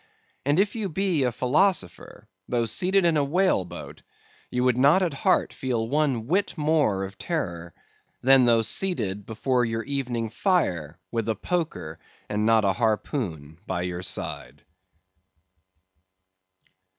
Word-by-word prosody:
And 145 Hz, +4 st, +3 dB
if 205 Hz, +2 st, +1 dB
you 215 Hz, -4 st, -2 dB
be 180 Hz, -2 st, 0 dB
a 125 Hz, -, +1 dB
philosopher, 130 Hz, -, 0 dB, 0.2 s
though 120 Hz, -1 st, +1 dB
seated 180 Hz, -, +1 dB
in 170 Hz, -, +4 dB
the 150 Hz, -2 st, +2 dB
whale 170 Hz, -, +2 dB
boat, 80 Hz, -4 st, -9 dB, 0.5 s
you 125 Hz, 0 st, -1 dB
would 125 Hz, -2 st, +3 dB
not 145 Hz, +9 st, +4 dB
at 170 Hz, -5 st, -1 dB
heart 135 Hz, -, +1 dB
feel 120 Hz, -4 st, -2 dB
one 135 Hz, -4 st, 0 dB
whit 185 Hz, -, 0 dB
more 150 Hz, -11 st, +1 dB
of 95 Hz, 0 st, -8 dB
terror, 85 Hz, -, -4 dB, 0.4 s
than 130 Hz, 0 st, +5 dB
though 115 Hz, -1 st, +4 dB
seated 105 Hz, -, -1 dB
before 125 Hz, +3 st, 0 dB
your 115 Hz, -1 st, -2 dB
evening 125 Hz, -5 st, -3 dB
fire 90 Hz, -, 0 dB
with 115 Hz, -1 st, -2 dB
a 110 Hz, -, +1 dB
poker, 165 Hz, -, -3 dB, 0.3 s
and 105 Hz, +1 st, 0 dB
not 110 Hz, -2 st, +4 dB
a 95 Hz, -, +3 dB
harpoon, 100 Hz, -, -2 dB
by 90 Hz, -1 st, -2 dB
your 90 Hz, 0 st, -4 dB
side. 70 Hz, -5 st, -5 dB
120 Hz, 140 wpm, -25 LUFS, 100-155 Hz, 0.5 s, than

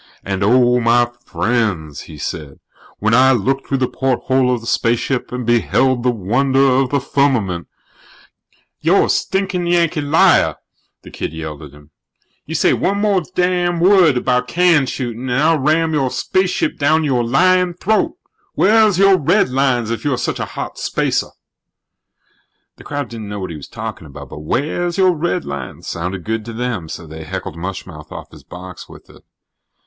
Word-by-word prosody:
"And, 95 Hz, 0 st, -3 dB
oh, 125 Hz, +3 st, +4 dB
my 120 Hz, 0 st, +3 dB
friends," 95 Hz, -, -1 dB
he 80 Hz, -, -10 dB
said, 70 Hz, 0 st, -6 dB, 0.4 s
"when 110 Hz, +2 st, 0 dB
I 130 Hz, +2 st, +6 dB
looked 135 Hz, +4 st, -1 dB
through 135 Hz, -, 0 dB
the 130 Hz, -1 st, 0 dB
porthole 130 Hz, 0 st, 0 dB
of 120 Hz, -2 st, -1 dB
the -, -, -12 dB
spaceship 120 Hz, +3 st, 0 dB
and 125 Hz, -1 st, -4 dB
beheld 120 Hz, +2 st, +2 dB
the 125 Hz, -, +1 dB
wonder 125 Hz, +5 st, 0 dB
of 135 Hz, -1 st, +3 dB
the 140 Hz, -, +1 dB
Firmament 125 Hz, -11 st, 0 dB, 0.6 s
" -, -, -39 dB
"You're -, -, +3 dB
a -, -, -5 dB
stinkin' 190 Hz, -2 st, -1 dB
Yankee 170 Hz, -2 st, +1 dB
liar!" 145 Hz, +3 st, +3 dB, 0.5 s
the -, -, -12 dB
kid -, -, -5 dB
yelled 80 Hz, -1 st, -7 dB
at 75 Hz, -2 st, -11 dB
him. 75 Hz, +1 st, -18 dB, 0.6 s
"You -, -, -4 dB
say -, -, +3 dB
one 200 Hz, -1 st, +1 dB
damn 180 Hz, -1 st, +1 dB
more 170 Hz, +2 st, +3 dB
word 180 Hz, -9 st, +5 dB
about 125 Hz, 0 st, 0 dB
can 170 Hz, -3 st, +3 dB
shootin' 125 Hz, 0 st, -4 dB
and 125 Hz, +2 st, +1 dB
I'll 160 Hz, +1 st, +3 dB
ram 160 Hz, +3 st, +1 dB
your 135 Hz, -4 st, +1 dB
spaceship 185 Hz, -, -1 dB
down 155 Hz, +2 st, +3 dB
your 130 Hz, -5 st, +1 dB
lyin' 180 Hz, +8 st, +2 dB
throat! 220 Hz, -, 0 dB, 0.4 s
Wheah's 215 Hz, -1 st, +4 dB
your 195 Hz, -1 st, +5 dB
redlines 135 Hz, -, +1 dB
if 115 Hz, -, -4 dB
you're 145 Hz, -4 st, 0 dB
such -, -, -2 dB
a -, -, -2 dB
hot -, -, -5 dB
spacer?" -, -, -1 dB, 1.5 s
The -, -, -14 dB
crowd 145 Hz, -1 st, -4 dB
didn't 110 Hz, -3 st, -7 dB
know 105 Hz, 0 st, -5 dB
what 95 Hz, -2 st, -5 dB
he -, -, -6 dB
was 75 Hz, -, -9 dB
talking -, -, -7 dB
about, -, -, -11 dB
but -, -, -9 dB
"wheah's 155 Hz, -, -2 dB
your 185 Hz, -1 st, +4 dB
redlines" 155 Hz, -, -4 dB
sounded 90 Hz, +2 st, -4 dB
good 110 Hz, +2 st, -3 dB
to 115 Hz, -, -7 dB
them, 110 Hz, -8 st, -3 dB
so 80 Hz, -, -7 dB
they 80 Hz, +1 st, -9 dB
heckled 75 Hz, -, -6 dB
mush 95 Hz, +3 st, -5 dB
mouth 75 Hz, -4 st, -12 dB
off -, -, -9 dB
his -, -, -15 dB
box 90 Hz, 0 st, -10 dB
with -, -, -14 dB
it. -, -, -18 dB
130 Hz, 175 wpm, -18 LUFS, 110-165 Hz, 1.5 s, I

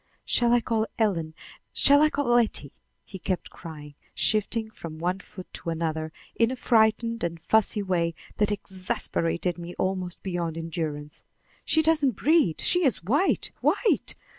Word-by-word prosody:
"Shall 240 Hz, -1 st, +3 dB
I 240 Hz, 0 st, +4 dB
call 225 Hz, -1 st, 0 dB
Ellen? 165 Hz, -8 st, 0 dB, 0.4 s
Shall 285 Hz, +1 st, +6 dB
I 305 Hz, -, +5 dB
call 285 Hz, -1 st, -2 dB
Letty?" 220 Hz, -, +1 dB, 0.3 s
he 190 Hz, -, -9 dB
kept 185 Hz, 0 st, -3 dB
crying, 150 Hz, -4 st, -10 dB, 0.2 s
shifting 220 Hz, +1 st, 0 dB
from 165 Hz, -6 st, -8 dB
one 180 Hz, +4 st, -1 dB
foot 185 Hz, -1 st, -11 dB
to -, -, -5 dB
another 160 Hz, -1 st, -2 dB, 0.2 s
in 230 Hz, 0 st, +3 dB
a 260 Hz, -, -3 dB
frightened 230 Hz, -1 st, +2 dB
and 170 Hz, -1 st, -2 dB
fussy 215 Hz, +3 st, +2 dB
way 170 Hz, -3 st, 0 dB, 0.2 s
that 210 Hz, 0 st, +2 dB
exasperated 180 Hz, -3 st, -1 dB
me 175 Hz, +1 st, -7 dB
almost 185 Hz, -1 st, -2 dB
beyond 175 Hz, -3 st, -3 dB
endurance. 155 Hz, -3 st, -5 dB, 0.4 s
"She 315 Hz, -, +3 dB
doesn't 300 Hz, -6 st, +3 dB
breathe; 300 Hz, -, +2 dB
she 355 Hz, 0 st, +3 dB
is 255 Hz, -, +1 dB
white, 285 Hz, -, +1 dB
white! 450 Hz, -, +1 dB
190 Hz, 150 wpm, -26 LUFS, 165-230 Hz, 0.4 s, Shall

